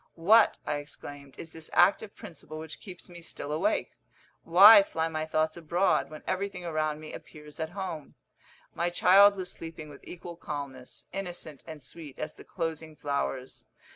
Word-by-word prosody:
"What," 215 +7 +5
I 145 - -1
exclaimed, 145 -1 -9
"is 165 - -8
this 160 -1 -8
active 200 +3 +3
principle 155 -2 -10
which 160 0 -8
keeps 180 -3 -10
me 175 -1 -11
still 150 -3 -7
awake? 175 +8 0 0.5
Why 200 +5 +9
fly 165 -4 -2
my 155 -1 -3
thoughts 155 +1 0
abroad, 170 -3 +1
when 155 0 -10
everything 185 -1 -3
around 155 -2 -1
me 155 0 -9
appears 150 +1 -11
at 160 0 -2
home?" 170 -6 -5 0.6
My 170 +1 0
child 195 +3 +6
was 185 -2 -4
sleeping 160 -2 -8
with 140 - -13
equal 175 -1 -9
calmness 140 -5 -7
innocent 175 -6 -6
and 155 -4 -9
sweet 150 -2 -10
as 155 0 -5
the - - -14
closing 160 -2 -5
flowers. 140 -3 -3
160 Hz, 165 wpm, -29 LUFS, 150-180 Hz, 0.6 s, Why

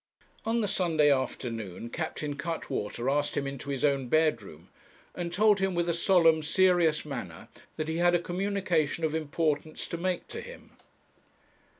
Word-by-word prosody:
On 230 +1 +1
the 210 - 0
Sunday 160 -6 +3
afternoon 115 -5 -3
Captain 155 -2 -3
Cuttwater 130 -7 -4
asked 145 +1 +1
him 140 - 0
into 140 0 -6
his 135 0 0
own 140 -3 +1
bedroom, 120 - 0 0.4
and 175 -1 -4
told 210 +2 +4
him 195 -1 0
with 170 0 0
a 170 - +1
solemn, 170 -2 +4
serious 170 -1 +3
manner 120 - -7 0.3
that 155 - -3
he 160 0 -2
had 175 0 +4
a - - +3
communication 180 -4 -1
of 155 -1 +1
importance 155 -1 -1
to 170 - -5
make 180 +1 -2
to - - -6
him. - - -12
160 Hz, 160 wpm, -29 LUFS, 140-175 Hz, 0.4 s, told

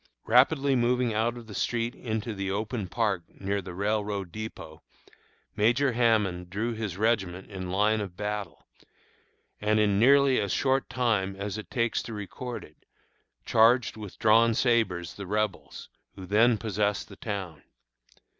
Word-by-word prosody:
Rapidly 135 +3 +4
moving 125 -1 +1
out 115 +3 0
of 120 - -10
the 110 - -10
street 115 +4 -1
into 110 -2 -4
the 100 -1 -3
open 105 +1 -3
park 105 -2 0 0.2
near 100 +1 -1
the 90 -1 -9
railroad 100 -2 -2
dépôt, 105 -6 -8 0.8
Major 120 +6 +3
Hammond 105 -7 +1
drew 110 +5 -2
his 110 -5 -4
regiment 100 -4 -1
in 95 -2 -5
line 105 +3 +2
of 95 -3 -7
battle, 105 -1 -4 0.9
and 105 +1 +2
in 100 -2 +2
nearly 140 +2 +5
as 100 -2 -2
short 135 0 +1
time 105 -6 0
as 100 +2 -4
it 110 - -10
takes 115 -3 0
to 115 - -8
record 120 +4 -6
it, 75 - -16 0.7
charged 115 +3 +4
with 105 -3 -9
drawn 115 +1 +4
sabres 110 -10 +1
the 100 -2 -8
Rebels, 105 -1 -3 0.3
who 95 - -9
then 110 +5 +4
possessed 105 -1 -1
the 100 - -12
town. 95 -8 -5
105 Hz, 150 wpm, -27 LUFS, 100-115 Hz, 0.9 s, nearly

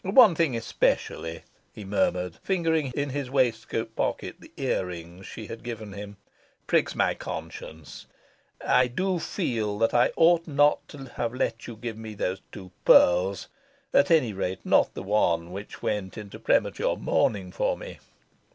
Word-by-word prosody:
One 205 +1 +7
thing 160 -6 +1
especially," 85 -6 -1 0.3
he 105 - -8
murmured, 90 -3 0
fingering 160 -7 0
in 145 -1 -1
his 140 -2 -3
waistcoat 115 -3 0
pocket - - -2
the - - -15
ear 90 - 0
rings 85 +1 -9
she 110 - -8
had 115 +2 -8
given 110 -4 -6
him, 100 0 -8 0.5
"pricks - - +1
my - - +2
conscience. 80 -2 -8 0.6
I 125 0 +4
do 185 +8 -1
feel 115 - -2
that 115 +1 +2
I 120 - +4
ought 170 0 +4
not 145 0 +3
to 135 -2 -10
have 115 +1 -2
let 115 -3 -2
you 120 - -7
give 110 0 -6
me 110 -1 -7
these 95 -1 -2
two 95 -3 -10
pearls 90 +3 +5 0.5
at 190 - +5
any 150 -10 +4
rate, 95 -1 -3
not - - +4
the - - -5
one 90 -4 +1
which 100 +3 -8
went 105 -2 -2
into 105 -2 -8
premature - - +1
mourning 95 -4 0
for - - 0
me. - - -9
110 Hz, 160 wpm, -26 LUFS, 95-140 Hz, 0.6 s, One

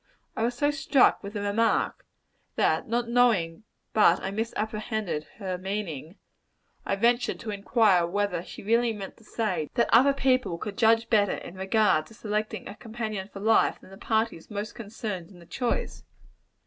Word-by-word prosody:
I - - -3
was 240 +2 0
so 290 +4 +2
struck 275 -2 +3
with 200 0 -8
the 205 - -3
remark, 205 +3 0 0.5
that - - +1
not 235 +1 0
knowing 220 -7 +2 0.3
but 215 - +5
I 190 - -4
misapprehended 215 -5 -3
her 185 -4 -4
meaning, 185 -5 -4 0.7
I - - +1
ventured 235 +4 +1
to 220 - -4
inquire 200 -3 +3
whether 200 -1 -1
she 180 - -10
really 230 +2 +2
meant 200 -2 -7
to - - -20
say, 185 -9 -2
that 235 - +2
other 265 +5 +6
people 255 -9 +1
could 205 +3 -6
judge 225 0 +3
better 205 -3 +3
in - - -9
regard 190 -4 +2
to 225 - -16
selecting 215 0 -3
a - - -7
companion 215 -3 -5
for 195 - -8
life, 220 +2 +3
than - - -17
the 195 - -11
parties 220 -7 -1
most 210 +1 -5
concerned 205 -5 -6
in 190 - -15
the 170 - -15
choice. 245 +7 -3
215 Hz, 170 wpm, -27 LUFS, 195-230 Hz, 0.7 s, other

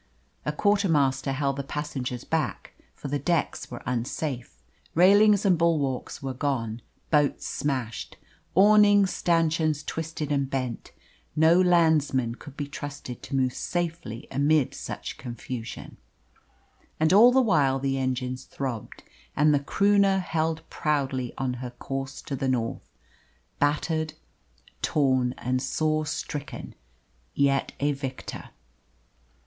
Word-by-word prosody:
A - - +2
quarter 205 +4 +2
master 135 -3 +2
held 140 0 -1
the 140 - -2
passengers 135 -4 -4
back, 160 -6 -2 0.2
for - - -7
the 145 +1 -1
decks 165 +2 -1
were 120 - -8
unsafe. 125 - -3 0.4
Railings 205 +4 +6
and 180 -4 +4
bulwarks 145 -7 0
were 135 -1 -3
gone, 125 -4 -2 0.3
boats 145 -2 +2
smashed, 130 -6 -3 0.4
awning 205 0 +6
stanchions 165 -4 +1
twisted 160 -2 -4
and 140 -2 +1
bent. 130 -4 -3 0.4
No 160 +3 +5
landsmen 160 -9 +3
could 145 +3 -12
be 145 - -2
trusted 145 -3 -7
to 135 - -5
move 130 -2 +1
safely 165 -8 -3
amid 145 +1 +2
such - - -6
confusion. 120 0 -7 1.0
And 160 +3 +3
all 230 +5 +8
the 265 - +4
while 150 - +3
the 135 0 -1
engines 130 -1 -2
throbbed, 130 -5 -5 0.3
and 150 +1 +4
the 145 - +3
Croonah 200 +5 +3
held 160 -3 -2
proudly 135 -5 -1
on 130 -2 -1
her 125 - -4
course 135 +2 -6
to 140 - -4
the 135 0 -1
north 115 -3 -2 0.7
battered, 155 +2 0 0.7
torn, 130 -4 +2
and 125 +1 -1
sore 155 +1 0
stricken, 145 -1 -5 0.6
yet 140 -1 +2
a 145 +1 +2
victor. 135 -2 -6
145 Hz, 125 wpm, -26 LUFS, 130-160 Hz, 1.0 s, all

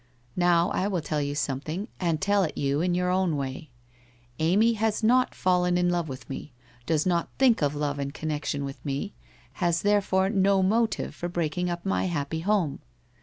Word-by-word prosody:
Now 175 -1 +3
I 190 - 0
will 185 -5 -1
tell 150 -1 -2
you 145 0 -2
something 155 +8 -3
and 170 -4 0
tell 200 +2 +2
it 165 - -2
you 140 +2 0
in 175 0 +1
your 180 0 +1
own 180 -4 +1
way. 135 +3 -5 0.7
Amy 200 +9 +3
has 220 0 -1
not 250 +3 +3
fallen 180 -1 +2
in 175 0 +2
love 170 -3 -1
with 130 -1 -8
me, 135 0 -7 0.3
does 155 -2 +1
not 175 -2 +1
think 255 -7 +4
of 145 0 +1
love 145 -1 -2
in 140 0 -2
con 155 +2 -5
nection 145 -1 -2
with 135 0 -8
me, 140 -1 -3 0.5
has 170 -1 +1
therefore 195 -2 +2
no 195 -1 +3
motive 220 +4 +1
for 175 - -5
breaking 175 +1 -1
up 175 +1 -4
my 195 - 0
happy 160 -3 -2
home. 175 -5 0
175 Hz, 190 wpm, -26 LUFS, 150-190 Hz, 0.7 s, think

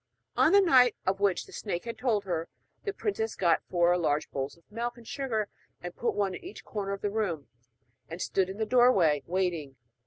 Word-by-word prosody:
On 315 - +5
the 400 +1 +7
night 255 - +5
of 190 +1 0
which 200 -2 +1
the - - -15
snake 185 -3 -4
had 230 - -4
told 230 -6 0
her, 170 -4 -3 0.4
the 405 - 0
princess 390 - -2
got 170 -3 +3
four 175 0 +3
large 150 -2 0
bowls 135 +3 -4
of 170 - -25
milk 240 +2 -3
and 235 -2 -14
sugar, 230 -7 -2 0.3
and 175 0 -7
put 240 - -1
one 200 -2 0
in - - -8
each 370 +3 -10
corner 200 -2 -3
of 200 - -6
the 205 - -1
room, 175 - -2 0.6
and 165 +1 -6
stood 190 0 0
in 190 - -6
the 220 - 0
doorway 215 - +4
waiting. 170 -6 -1
200 Hz, 210 wpm, -29 LUFS, 175-235 Hz, 0.6 s, the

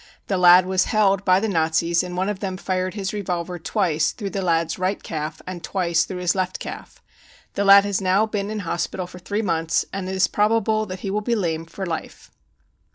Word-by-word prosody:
The 195 - -1
lad 180 0 +7
was 185 0 +1
held 200 -2 +2
by 185 -1 +4
the 220 - -1
Nazis 165 -1 +1
and 180 0 -6
one 190 +1 0
of 205 -2 -3
them 190 -3 -4
fired 185 0 -2
his 195 -2 -3
revolver 180 -3 -3
twice 165 -4 0
through 200 -4 -5
the 195 - -2
lad's 165 -1 0
right 185 +2 -1
calf 155 0 -5
and 180 -2 -7
twice 170 -3 0
through 185 -2 -6
his 175 -1 +2
left 185 -1 -2
calf. - - -9 0.5
The 200 - -1
lad 200 0 +8
has 200 -1 -1
now 190 +3 +3
been 205 -2 -3
in 215 -1 -3
hospital 175 +1 -3
for 180 0 -12
three 205 +5 -3
months, 165 -4 0
and 190 -1 -4
it 190 - -3
is 190 - +3
probable 215 0 +1
that 185 -1 -7
he 195 - -3
will 210 +1 -1
be 235 +2 0
lame 165 -6 -2
for 190 +3 -6
life. 165 -3 -6
185 Hz, 220 wpm, -22 LUFS, 175-200 Hz, 0.5 s, lad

